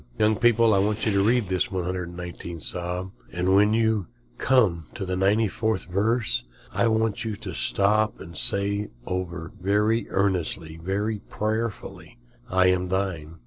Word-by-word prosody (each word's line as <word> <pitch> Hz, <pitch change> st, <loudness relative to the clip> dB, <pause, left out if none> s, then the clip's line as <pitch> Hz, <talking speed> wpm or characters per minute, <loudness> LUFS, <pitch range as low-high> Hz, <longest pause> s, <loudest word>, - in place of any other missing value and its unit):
Young 110 Hz, 0 st, +3 dB
people, 115 Hz, -2 st, +4 dB
I 100 Hz, -, +4 dB
want 105 Hz, +2 st, 0 dB
you 110 Hz, -, +2 dB
to 100 Hz, -1 st, +3 dB
read 115 Hz, 0 st, +2 dB
this 95 Hz, -1 st, 0 dB
119th 90 Hz, -2 st, -5 dB
Psalm, 90 Hz, +8 st, -3 dB, 0.2 s
and 90 Hz, +2 st, +1 dB
when 105 Hz, +2 st, +5 dB
you 110 Hz, -4 st, +1 dB, 0.3 s
come 105 Hz, -11 st, +3 dB
to 100 Hz, -5 st, -4 dB
the 95 Hz, -, -3 dB
94th 105 Hz, +2 st, +1 dB
verse 100 Hz, -, +1 dB, 0.3 s
I 115 Hz, -, +2 dB
want 110 Hz, -1 st, +1 dB
you 110 Hz, -2 st, -3 dB
to -, -, -7 dB
stop 105 Hz, +2 st, +2 dB
and 85 Hz, -, -10 dB
say 100 Hz, +4 st, +1 dB, 0.2 s
over 85 Hz, -2 st, -4 dB
very 105 Hz, +4 st, +1 dB
earnestly, 90 Hz, -5 st, -1 dB
very 100 Hz, +4 st, -1 dB
prayerfully, 110 Hz, -, -4 dB, 0.3 s
"I 95 Hz, 0 st, +3 dB
am 90 Hz, 0 st, +1 dB
thine." 90 Hz, -5 st, -2 dB
100 Hz, 145 wpm, -25 LUFS, 90-110 Hz, 0.3 s, when